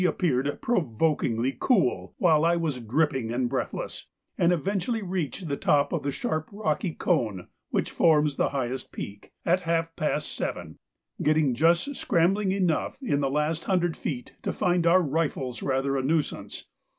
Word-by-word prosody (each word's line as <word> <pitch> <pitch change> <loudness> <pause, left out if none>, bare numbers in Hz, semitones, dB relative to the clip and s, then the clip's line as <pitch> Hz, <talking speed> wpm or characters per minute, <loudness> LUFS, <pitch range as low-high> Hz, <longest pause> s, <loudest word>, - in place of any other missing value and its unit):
appeared 145 -6 +1
provokingly 135 - +1
cool 125 - +1
while 160 -3 +4
I 170 +1 +4
was 160 -6 -1
dripping 130 0 0
and 125 +1 0
breathless, - - -4 0.3
and 170 - +3
eventually 200 - -1
reached 180 -2 -3
the 140 - -1
top 145 0 +2
of - - 0
the 140 - -2
sharp 155 +3 -3
rocky 190 -4 -1
cone 110 - 0 0.2
which - - -1
forms 150 -3 +3
the - - +1
highest 130 -2 -3
peak, 100 +1 -8
at 175 +2 +3
half 165 -1 -1
past 150 0 -1
seven, - - -5 0.4
getting 150 -3 +3
just 170 - +2
scrambling 190 0 +2
enough 185 -5 0
in 145 - +1
the 135 - +1
last 150 +3 -1
hundred 175 -3 +1
feet 125 -5 -5
to - - -2
find 175 -1 +1
our 180 +2 +5
rifles 140 -5 -2
rather 135 0 0
a 135 - +1
nuisance. 150 +3 -2
155 Hz, 155 wpm, -27 LUFS, 135-175 Hz, 0.4 s, our